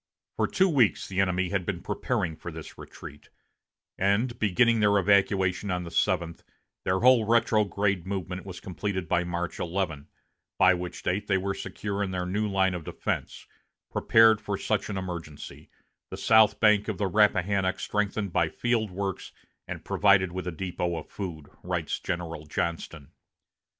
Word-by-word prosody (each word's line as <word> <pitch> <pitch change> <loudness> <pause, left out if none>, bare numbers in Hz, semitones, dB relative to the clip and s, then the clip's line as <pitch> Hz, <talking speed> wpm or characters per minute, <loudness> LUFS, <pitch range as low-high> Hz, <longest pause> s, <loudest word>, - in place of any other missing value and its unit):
For - - +1
two 190 - +3
weeks 135 - +2
the 95 -1 -3
enemy 95 -1 0
had 100 -1 -1
been - - -4
preparing 80 -2 -2
for 85 +2 -8
this 80 -1 -9
retreat; 75 - -12 0.7
and, 110 +6 +1
beginning 110 +3 +3
their 105 -1 +4
evacuation 100 0 +2
on 90 -1 -1
the 85 - -8
seventh, 85 -2 0 0.4
their 95 +1 +1
whole 125 -2 +6
retrograde 105 -4 +1
movement 95 -2 -4
was 95 -2 -8
completed 95 -1 -4
by 90 +1 +1
March 85 0 -4
11, 85 -5 -3 0.5
by - - +6
which 90 0 -6
date 100 +3 -1
they 95 - +2
were 95 +1 -2
secure 100 0 -4
in 100 - -1
their 90 -1 -3
new 100 +4 -1
line 95 -1 +2
of 90 -2 -5
defense, - - -4 0.5
"prepared 110 -1 +5
for - - -3
such - - -1
an 100 - -3
emergency 85 -5 -7 0.4
the - - -7
south 110 -1 +4
bank 105 -2 +4
of 110 -4 -3
the 100 - 0
Rappahannock 100 -1 +2
strengthened 105 -2 -2
by 80 - +2
field 115 0 0
works, 95 +1 -4 0.4
and - - -7
provided 95 -3 +3
with 90 0 -5
a - - -1
depot 90 0 -3
of 80 - -8
food," 85 -7 -6 0.2
writes - - -3
General 80 -3 -5
Johnston. 80 -2 -4
95 Hz, 160 wpm, -27 LUFS, 90-105 Hz, 0.7 s, whole